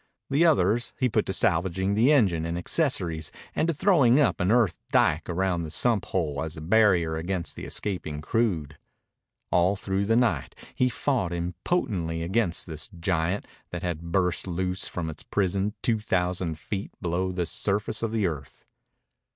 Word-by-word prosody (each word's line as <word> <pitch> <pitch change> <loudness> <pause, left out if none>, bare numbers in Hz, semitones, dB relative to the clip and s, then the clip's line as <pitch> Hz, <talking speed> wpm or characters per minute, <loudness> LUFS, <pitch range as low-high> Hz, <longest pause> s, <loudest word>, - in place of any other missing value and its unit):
The 150 +5 +4
others 120 - +2
he 130 - +2
put - - 0
to - - -1
salvaging 95 +3 +1
the 115 +7 +4
engine 95 - +3
and 85 +1 -2
accessories 90 - 0 0.2
and 155 - +1
to 170 - +1
throwing 150 -8 +4
up 145 - +2
an 90 +3 +2
earth 115 -6 +3
dike 75 +2 +2
around 90 0 0
the 80 - -5
sump 110 +5 +1
hole 75 -6 -1
as 80 0 -4
a - - -6
barrier 90 -3 +3
against 85 +1 -3
the - - -7
escaping 90 -7 -3
crude. 80 -6 -1 0.7
All 90 +3 +3
through 95 0 -1
the 115 +2 +2
night 120 -2 +1 0.2
he 125 - +2
fought 120 -7 -1
impotently 85 - -2
against 95 0 0
this 80 -3 -5
giant 85 +4 0 0.2
that - - -6
had 85 -1 -4
burst 90 0 +1
loose 90 +1 -2
from 85 -3 -4
its 80 - -6
prison 100 +1 -1
two 115 -2 +2
thousand 90 -5 -1
feet 100 +5 -5
below 90 +1 -1
the 90 -1 -1
surface 100 +4 -1
of 115 -1 -1
the 110 -3 +1
earth. 75 -6 -5
95 Hz, 165 wpm, -26 LUFS, 85-110 Hz, 0.7 s, The